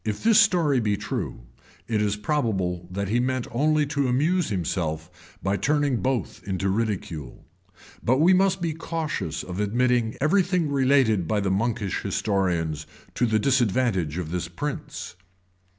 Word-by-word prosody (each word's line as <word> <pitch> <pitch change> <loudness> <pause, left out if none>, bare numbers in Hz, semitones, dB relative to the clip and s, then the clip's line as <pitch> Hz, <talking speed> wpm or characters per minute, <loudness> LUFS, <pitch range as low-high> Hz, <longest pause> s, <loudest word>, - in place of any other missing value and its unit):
[] - - -42
If 105 -2 -3
this 225 -1 +6
story 170 - +4
be 105 -3 0
true, 105 - -4 0.5
it 110 -2 0
is 105 -1 +1
probable 100 - -1
that 100 +1 -3
he 120 +3 +2
meant 130 0 0
only 150 +4 +2
to 140 -2 0
amuse 155 +7 +1
himself 85 -3 -4
by 95 +1 +1
turning 145 +3 +1
both 130 -2 -2
into 95 -1 -1
ridicule; 95 - -3 0.6
but 130 +3 +3
we 170 +6 +5
must 190 0 +2
be 165 -2 0
cautious 160 - -3
of 90 +1 -6
admitting 120 +2 +1
every 160 +8 +4
thing 180 -4 0
related 130 - +3
by 105 - +1
the 100 -1 0
monkish 105 -1 -1
historians 85 -7 -1 0.3
to 120 - +1
the 110 -1 +2
disadvantage 110 - +1
of 85 -3 -4
this 90 -1 -2
prince. 145 - -5
115 Hz, 155 wpm, -25 LUFS, 95-145 Hz, 0.6 s, this